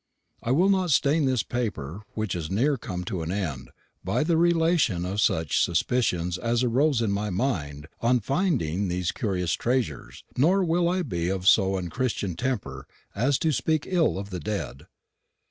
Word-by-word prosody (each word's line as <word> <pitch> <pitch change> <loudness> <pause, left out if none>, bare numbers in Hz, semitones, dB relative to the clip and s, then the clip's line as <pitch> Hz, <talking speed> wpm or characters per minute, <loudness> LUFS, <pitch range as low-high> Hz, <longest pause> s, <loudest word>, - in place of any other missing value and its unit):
I 115 - -4
will 170 +10 +4
not 190 -2 +2
stain 145 +2 +3
this 130 -6 +1
paper, 100 - -4
which 110 -4 -2
is 85 -3 -4
near 130 +10 +2
come 90 -7 -5
to 90 -1 -4
an 80 +1 -3
end, 80 -10 -3 0.3
by - - 0
the 165 +1 +1
relation 165 - +2
of 100 +3 -1
such 80 -7 +1
suspicions 90 -1 0
as 120 +1 0
arose 130 +1 +2
in 105 - 0
my 105 +1 -1
mind 80 - -2
on 125 +2 +3
finding 115 - 0
these 90 -1 -1
curious 90 -8 -1
treasures; 120 - -2
nor 180 +9 +3
will 170 +1 +2
I 185 +1 0
be 85 - -2
of 95 0 -2
so 95 -2 +5
unchristian 95 +3 -2
a - - -7
temper 95 - -3 0.3
as 130 +6 +1
to 160 - +1
speak 155 +2 0
ill 175 - +1
of 100 +1 -6
the 90 - -4
dead. 75 - -5
110 Hz, 175 wpm, -26 LUFS, 90-140 Hz, 0.3 s, so